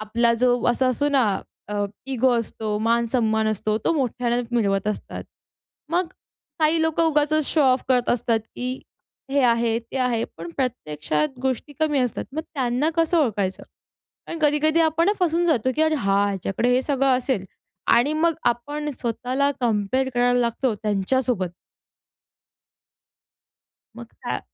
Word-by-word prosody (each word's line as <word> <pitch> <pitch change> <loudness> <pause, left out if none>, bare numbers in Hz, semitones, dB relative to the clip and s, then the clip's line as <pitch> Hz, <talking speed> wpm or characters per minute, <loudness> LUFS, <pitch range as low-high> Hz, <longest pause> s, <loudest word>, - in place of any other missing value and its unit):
आपला 235 +2 +1
जो 250 +2 +2 0.2
असा 240 +2 +2
असतो 285 +4 +1
ना, 275 -2 +3 0.5
अ, 205 0 -1 0.3
इगो 255 +1 +3
असतो, 215 -2 -3
मान-सन्मान 225 -1 +1
असतो 215 0 -1
तो - - +3
मोठ्यानं 245 -3 0
मिरवत 195 -3 +1
असतात. 210 - -5 0.7
मग 360 +1 +2 0.5
काही 315 +1 +3
लोकं 320 +1 +1
उगाचच 300 0 +1
शो 320 - +1
ऑफ 260 -1 +3
करत 250 -2 +2
असतात, 230 -1 +1 0.2
की 255 +1 -4 0.5
हे 280 0 +2
आहे, 230 -1 +2
ते 235 +3 -9
आहे. 245 -3 +1
पण 165 +1 -7
प्रत्यक्षात 155 - -2
गोष्टी 265 +2 -2
कमी 305 -2 +2
असतात. 250 -3 -1
मग 315 - -2
त्यांना 260 +3 0
कसं 330 +1 +2
ओळखायचं. 205 -10 0 0.6
कारण 330 - -5
कधी-कधी 305 +2 +3
आपण 330 +4 +3
फसून 345 -1 +2
जातो, 260 -6 +2
की 310 - +3
अरे 315 0 +3
हा! 200 -6 +2
ह्याच्याकडे 195 +3 -1
हे 255 - +2
सगळं 270 -2 +2
असेल. 250 -6 -1 0.5
आणि 245 +6 +3
मग 335 -1 +3
आपण 290 +5 -3
स्वतःला 250 +4 0
कंपेअर 240 +3 0
करायला 245 0 +3
लागतो 235 +1 0
त्यांच्यासोबत. 210 +1 0 2.5
मग - - -9 0.2
का - - -2
250 Hz, 140 wpm, -23 LUFS, 225-290 Hz, 2.5 s, ना